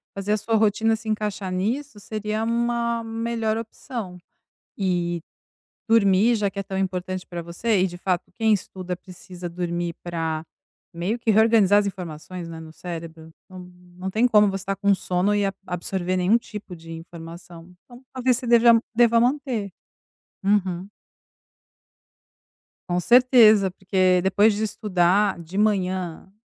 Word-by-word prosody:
fazer 195 +1 -3
a 215 - +2
sua 225 +2 -1
rotina 220 +1 +2
se 220 0 -8
encaixar 210 -3 -2
nisso, 220 +7 -2
seria 215 +1 -3
uma 235 0 0
melhor 225 -1 -2
opção. 225 -4 -7 0.6
E 175 -3 -1 0.7
dormir, 220 0 +4
já 210 -3 0
que 200 - -10
é 195 - -1
tão 195 0 -6
importante 185 -1 -3
para 175 -1 -6
você, 185 +5 0
e - - +3
de 175 -1 -7
fato, 180 -1 -2
quem 225 -2 +2
estuda 185 -2 -3
precisa 180 0 -10
dormir 175 0 -3
para 165 -2 -3 0.5
meio 180 +8 -2
que 235 -1 0
reorganizar 215 -2 +5
as 205 - -2
informações, 180 -2 -6
né, 165 -1 -8
no 160 -1 -11
cérebro. 165 -1 -8 0.2
Não, 185 - -10 0.4
não 185 +1 -4
tem 225 +5 +2
como 210 -3 +5
você 195 -1 -3
estar 195 0 -3
com 200 0 +3
sono 185 +2 0
e 205 -1 +1
a 195 - 0
absorver 180 +1 -2
nenhum 185 +6 +3
tipo 210 -5 -9
de 165 0 -11
informação. 165 +1 -11
Então 245 0 -15
talvez 255 -1 +1
você 250 - -6
deva, 235 -1 +6
deva 235 0 +5
manter. 245 -5 0 0.7
Uhum. 190 -2 +1 2.0
Com 175 0 +1
certeza, 230 -3 +6
porque 185 -1 +2
depois 205 +4 +4
de 210 +2 -2
estudar 195 -2 +1
de 170 +4 -8
manhã, 185 -4 -1
195 Hz, 150 wpm, -24 LUFS, 180-220 Hz, 2.0 s, deva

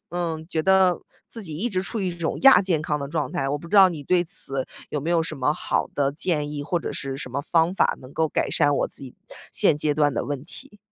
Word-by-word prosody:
嗯， 165 -2 -3
觉 160 - 0
得 190 -1 +4 0.3
自 225 - -7
己 155 -5 -6
一 225 +8 0
直 185 -2 -1
处 225 - -3
于 190 - -1
一 175 - -4
种 170 -2 -3
亚 270 -6 +8
健 180 -5 0
康 150 -2 -2
的 140 - -4
状 150 -3 -2
态， 135 - -1
我 145 +1 -1
不 170 - -11
知 205 - -5
道 195 -1 +9
你 160 -5 -6
对 180 +4 +3
此 135 -6 -1 0.2
有 150 - -2
没 160 +5 -3
有 170 -1 +3
什 160 -1 -5
么 135 +2 +1
好 - - -1
的 140 -1 0
建 150 -1 -1
议， 145 -1 -4
或 170 +4 -1
者 - - -5
是 135 -1 -4
什 130 -2 -6
么 140 - -1
方 165 +3 +2
法 - - +2
能 130 +1 -13
够 160 +1 0
改 - - -1
善 145 -2 +2
我 - - +1
自 - - -6
己 135 -3 -11 0.3
现 - - +3
阶 150 0 0
段 145 -2 +1
的 - - -1
问 140 -2 -4
题。 210 - -12
160 Hz, 290 characters per minute, -24 LUFS, 145-175 Hz, 0.3 s, 道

